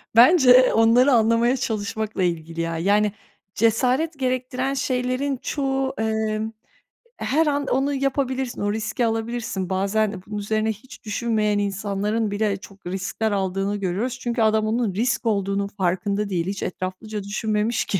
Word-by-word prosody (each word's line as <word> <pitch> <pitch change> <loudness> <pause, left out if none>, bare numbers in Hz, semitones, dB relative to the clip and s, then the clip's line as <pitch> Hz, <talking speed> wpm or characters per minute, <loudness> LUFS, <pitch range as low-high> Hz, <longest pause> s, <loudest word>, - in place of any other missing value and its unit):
Bence, 255 +2 +7
eee, 255 +1 +7
onları 235 +5 +5
anlamaya 230 +3 +3
çalışmakla 220 -3 -2
ilgili 165 -1 -2
ya. 165 0 -2
Yani, 205 +4 +2 0.4
cesaret 255 +8 +1
gerektiren 255 +1 -1
şeylerin 255 +1 -1
çoğu, 270 -2 -1
eee, 220 -1 0 0.8
her 315 +3 +1
an 285 -1 0
onu 275 +2 +1
yapabilirsin 265 -2 -1
o 205 0 0
riski 225 +2 -1
alabilirsin. 225 -4 -2
Bazen 200 +1 0
bunun 210 0 -5
üzerine 215 +2 0
hiç 245 +5 -12
düşünmeyen 210 -1 0
insanların 205 +2 -1
bile 205 -1 0
çok 195 0 -15
riskler 195 +4 -2
aldığını 195 +1 -1
görüyoruz. 205 +7 -2
Çünkü 240 -1 -2
adam 215 0 +3
onun 225 -3 0
risk 235 +4 0
olduğunun 200 -2 0
farkında 200 +2 -1
değil. 175 -3 -1
Hiç 195 0 -3
etraflıca 195 +3 -5
düşünmemiş 215 +2 -1
ki. 195 - -1
220 Hz, 140 wpm, -23 LUFS, 200-250 Hz, 0.8 s, Bence